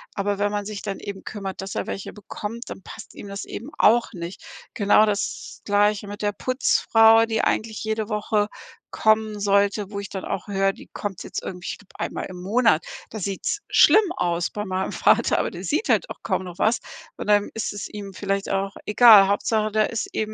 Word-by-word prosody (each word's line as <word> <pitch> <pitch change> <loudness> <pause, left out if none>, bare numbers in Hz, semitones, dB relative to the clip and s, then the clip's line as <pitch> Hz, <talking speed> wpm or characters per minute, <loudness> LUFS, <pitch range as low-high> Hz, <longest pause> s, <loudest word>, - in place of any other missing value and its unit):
aber 200 0 -1
wenn 205 0 +1
man 205 -1 -2
sich 210 -1 -6
dann 200 -2 -4
eben 200 -1 -7
kümmert, 195 -3 -6
dass 195 - -6
er - - -2
welche 195 - -5
bekommt, 210 +3 -7
dann - - -8
passt 220 - -11
ihm - - -9
das 200 0 -6
eben 240 +7 -7
auch 235 +2 +4
nicht. 170 +1 -7 0.3
Genau 205 +1 +5
das 205 -1 -3
Gleiche 205 0 +2
mit 205 0 -7
der 205 0 +1
Putzfrau, 225 -2 +4
die 225 -1 0
eigentlich 220 -1 -1
jede 220 0 -2
Woche 210 -1 0 0.4
kommen 215 -1 +2
sollte, 200 0 +2
wo 200 - -4
ich 200 - -6
dann 190 -1 -6
auch 185 - -4
höre, 195 -1 +1
die - - -14
kommt 200 -4 -5
jetzt - - -5
irgendwie 180 -1 -7
ich - - -7
glaube 205 - -21
einmal - - -3
im 180 -1 -9
Monat. 210 -3 +2 0.2
Da 220 - -7
sieht's 200 - -2
schlimm 420 -4 +6
aus 175 0 0
bei 210 0 -4
meinem 190 0 -2
Vater, - - +3
aber - - 0
der - - -8
sieht 445 - -1
halt - - +3
auch - - -8
kaum - - -1
noch 180 0 -10
was 225 +3 +2 0.4
und - - -5
dann 205 -1 +3
ist 225 - -2
es 205 - -5
ihm 200 -2 -8
vielleicht 195 +1 -2
auch 195 0 -1
egal. 210 -2 +8
Hauptsache, 215 +1 +1
da 215 0 +3
ist 225 0 -3
eben 215 0 -2
205 Hz, 210 wpm, -23 LUFS, 195-220 Hz, 0.4 s, egal